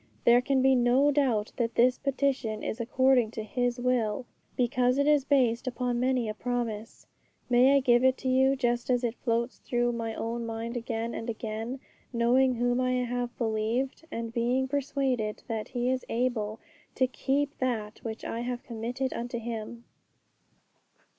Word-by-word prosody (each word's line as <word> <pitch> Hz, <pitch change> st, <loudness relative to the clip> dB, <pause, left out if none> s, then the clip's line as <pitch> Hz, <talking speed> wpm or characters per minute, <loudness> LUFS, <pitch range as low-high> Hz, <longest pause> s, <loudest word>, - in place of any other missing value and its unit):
There 240 Hz, +1 st, +6 dB
can 265 Hz, 0 st, +1 dB
be 265 Hz, 0 st, +5 dB
no 255 Hz, +3 st, +4 dB
doubt 250 Hz, -7 st, +1 dB
that 230 Hz, -2 st, -1 dB
this 250 Hz, +2 st, +4 dB
petition 265 Hz, -5 st, -1 dB
is 225 Hz, -, -3 dB
according 255 Hz, -1 st, +3 dB
to 220 Hz, -, -2 dB
His 245 Hz, +3 st, -1 dB
will, 245 Hz, -2 st, 0 dB, 0.3 s
because 250 Hz, +1 st, +2 dB
it 280 Hz, -, +3 dB
is 295 Hz, -2 st, +3 dB
based 255 Hz, -4 st, +2 dB
upon 245 Hz, -1 st, -1 dB
many 255 Hz, -2 st, +1 dB
a 215 Hz, -, -2 dB
promise. 230 Hz, -2 st, -4 dB, 0.5 s
May 255 Hz, +3 st, +6 dB
I 280 Hz, -, +4 dB
give 240 Hz, -1 st, +4 dB
it 260 Hz, 0 st, +4 dB
to 260 Hz, -, -5 dB
you 265 Hz, +1 st, +4 dB
just 240 Hz, -2 st, -1 dB
as 250 Hz, -1 st, +2 dB
it 235 Hz, -2 st, 0 dB
floats 235 Hz, 0 st, -2 dB
through 240 Hz, 0 st, 0 dB
my 230 Hz, -1 st, -3 dB
own 235 Hz, +1 st, -3 dB
mind 230 Hz, +1 st, -4 dB
again 230 Hz, -1 st, -3 dB
and 225 Hz, -, -5 dB
again, 225 Hz, +3 st, -4 dB, 0.3 s
knowing 250 Hz, +2 st, +3 dB
whom 245 Hz, +1 st, +1 dB
I 255 Hz, 0 st, +1 dB
have 245 Hz, -1 st, -2 dB
believed, 230 Hz, +5 st, -1 dB
and 230 Hz, 0 st, -4 dB
being 245 Hz, +3 st, +1 dB
persuaded 265 Hz, -5 st, -1 dB
that 220 Hz, -2 st, -3 dB
He 245 Hz, 0 st, -1 dB
is 260 Hz, -1 st, -1 dB
able 225 Hz, -3 st, -1 dB, 0.4 s
to 260 Hz, -, +3 dB
keep 275 Hz, +4 st, -1 dB
that 220 Hz, -5 st, -2 dB
which 225 Hz, -1 st, -6 dB
I 230 Hz, -, -3 dB
have 245 Hz, 0 st, -4 dB
committed 245 Hz, +3 st, -3 dB
unto 240 Hz, +1 st, -4 dB
Him? 230 Hz, 0 st, -6 dB
245 Hz, 165 wpm, -28 LUFS, 230-260 Hz, 0.5 s, There